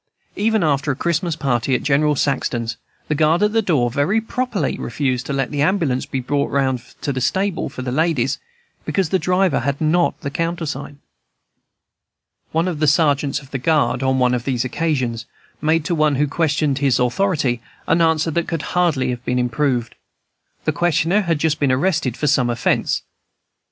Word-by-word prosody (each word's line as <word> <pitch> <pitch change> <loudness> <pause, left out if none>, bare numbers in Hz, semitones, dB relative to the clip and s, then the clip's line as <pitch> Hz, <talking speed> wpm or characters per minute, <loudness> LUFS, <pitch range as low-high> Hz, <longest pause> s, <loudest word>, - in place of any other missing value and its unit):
Even 220 0 +1
after 145 -1 +1
a - - -2
Christmas 170 +2 -1
party 130 -4 0
at - - -2
General 150 +1 +2
Saxton's, 120 -5 -1 0.3
the - - 0
guard 160 +5 +3
at 210 0 +2
the 225 - +3
door 145 - +1
very 150 - +1
properly 225 - -2
refused 130 0 -2
to - - -3
let 135 -2 -1
the 145 -1 -1
ambulance 155 -6 +1
be 135 - -2
brought 140 +3 -1
round 130 -3 0
from 140 +3 -6
the 130 - -3
stable 190 +4 0
for 130 - -7
the 125 - -3
ladies 145 -3 +1 0.4
because 190 -5 0
the 190 - +2
driver 180 +2 +2
had 140 +3 -2
not 165 +3 +1
the 140 - -4
countersign. 165 -3 -4 1.5
One 165 +3 +1
of 170 -5 -3
the 155 - +2
sergeants 145 -2 +2
of 135 - -17
the 135 - -3
guard, 150 -2 +1
on 130 0 +1
one 125 -1 +3
of 120 -2 -1
these 130 -2 -1
occasions, 125 -5 -1 0.3
made 160 +1 +1
to 175 - 0
one 155 -3 +2
who 145 +3 +2
questioned 150 -2 0
his 135 -3 +2
authority 130 -2 +1 0.2
an 170 - +2
answer 160 0 +2
that 170 +2 -1
could 165 -3 -3
hardly 155 -8 +2
have 120 0 -5
been 125 - -1
improved. 125 -1 0 0.7
The - - +2
questioner 175 +5 +2
had 170 -5 0
just 155 0 0
been 140 -3 +2
arrested 135 -3 0
for - - -2
some 135 -4 +3
offence. 120 0 0
145 Hz, 180 wpm, -20 LUFS, 130-165 Hz, 1.5 s, guard